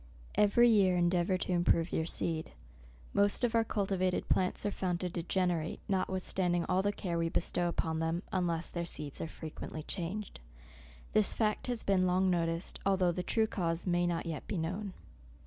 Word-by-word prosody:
Every 210 +4 +5
year 195 -5 +4
endeavour 175 +1 +2
to 185 - -3
improve 175 -1 +2
your 160 - 0
seed. 160 -2 -1 0.6
Most 200 +4 +2
of 240 -1 +2
our 230 -1 +4
cultivated 195 -4 0
plants 185 +2 +1
are 205 - +1
found 180 -3 -1
to 180 - -1
degenerate, 175 -1 -1
notwithstanding 185 -2 0
all 185 0 +2
the 205 +1 +1
care 175 -4 -3
we 165 - +1
can - - -6
bestow 175 0 +1
upon 160 -2 -1
them, 165 +3 -1
unless 175 -4 -1
their 170 - -2
seeds 150 -4 -4
are - - -2
frequently 155 -1 -7
changed. 190 - -4 0.7
This 215 -2 +3
fact 215 +1 0
has 245 -2 -1
been 185 -2 +3
long 185 +1 +3
noticed, 165 0 -1
although 190 -2 +3
the 180 - -3
true 220 +5 +2
cause 170 -6 -2
may 175 -1 +2
not 170 -1 -1
yet 160 -3 -5
be 195 - -2
known. 185 +5 -3
180 Hz, 180 wpm, -32 LUFS, 170-195 Hz, 0.7 s, Every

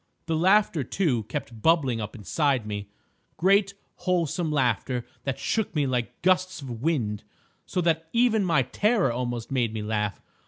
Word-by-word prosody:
The 165 - -1
laughter, 185 -2 +3
too, 130 - 0
kept 110 +1 -6
bubbling 135 -8 +3
up 105 +3 -6
inside 125 - 0
me—great 170 - -1 0.2
wholesome 175 -2 0
laughter 125 -3 0 0.2
that 135 -1 -1
shook 215 +6 -1
me 150 -2 +2
like 125 +1 -2
gusts 185 0 +2
of 125 -5 -7
wind—so 135 - -3
that 160 -1 0
even 230 -3 +3
my 165 -8 +3
terror 205 - +1
almost 120 -1 -3
made 120 -4 0
me 110 - -3
laugh. 105 -2 -1
140 Hz, 145 wpm, -26 LUFS, 115-180 Hz, 0.2 s, laughter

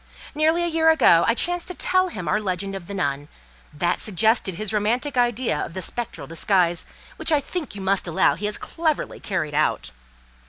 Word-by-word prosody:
Nearly 320 +3 +2
a - - +1
year 320 -1 +3
ago 175 - +5
I 230 - +3
chanced 355 +5 0
to 365 - -5
tell 370 0 +2
him 185 - -6
our 215 - +1
legend 195 0 -3
of 190 -3 -7
the 200 - -6
nun; 145 -5 -2 0.4
that 175 +4 -1
suggested 215 -1 +2
his 215 +3 -3
romantic 240 +7 0
idea 240 -8 +1
of 165 - -8
the 185 - -4
spectral 240 +7 -4
disguise, 175 +1 +1 0.3
which - - -1
I 300 - +4
think 305 - -5
you 200 - -7
must 190 -1 +1
allow 160 -3 +3
he 195 +8 -3
has 210 - +1
very - - -10
cleverly 320 -3 -1
carried 170 -7 -3
out. 155 +1 0
210 Hz, 200 wpm, -23 LUFS, 175-295 Hz, 0.4 s, ago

